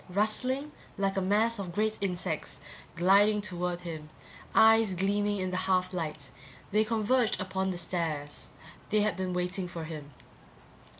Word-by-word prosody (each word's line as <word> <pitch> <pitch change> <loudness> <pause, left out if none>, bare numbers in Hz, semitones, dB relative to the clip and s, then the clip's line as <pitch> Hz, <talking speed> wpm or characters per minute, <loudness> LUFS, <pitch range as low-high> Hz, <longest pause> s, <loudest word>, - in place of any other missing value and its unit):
Rustling 255 +9 0 0.3
like 195 -1 0
a 195 - +1
mass 215 +4 +2
of 180 -3 -5
great 215 +1 0
insects, 180 -3 -2 0.4
gliding 200 +4 +5
toward 180 -3 -3
him, 160 -3 -7 0.5
eyes 220 -3 +6
gleaming 205 +2 +1
in 185 -1 -2
the 185 - -1
half 185 0 +1
light, 155 -5 -4 0.4
they 215 +2 +4
converged 225 +2 +1
upon 190 0 -1
the 180 - -3
stairs. 165 -4 -3 0.4
They 215 0 +3
had 210 -4 +1
been 185 0 -2
waiting 180 +1 -2
for 170 -2 -6
him. 155 -3 -7
190 Hz, 145 wpm, -30 LUFS, 175-210 Hz, 0.5 s, eyes